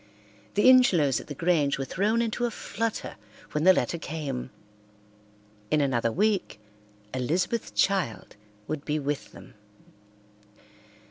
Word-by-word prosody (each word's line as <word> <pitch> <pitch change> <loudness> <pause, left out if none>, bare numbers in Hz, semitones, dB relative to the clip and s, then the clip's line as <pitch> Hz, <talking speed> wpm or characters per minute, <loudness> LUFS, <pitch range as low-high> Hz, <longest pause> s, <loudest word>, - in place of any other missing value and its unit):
The 205 - +4
Ingelows 175 - +5
at - - -15
the 145 - -6
Grange 160 -3 +1
were 135 - -3
thrown 215 - +1
into 235 +2 -1
a - - 0
flutter 230 0 -4 0.3
when 150 +2 -1
the 185 - +9
letter 170 -2 0
came. 140 -5 -4 1.2
In 155 - +2
another 120 -5 +1
week 200 - 0 0.5
Elizabeth's 170 - -1
child 190 - 0 0.3
would 155 -2 -4
be 150 0 -1
with 145 -1 -3
them. - - -14
160 Hz, 125 wpm, -27 LUFS, 140-205 Hz, 1.2 s, the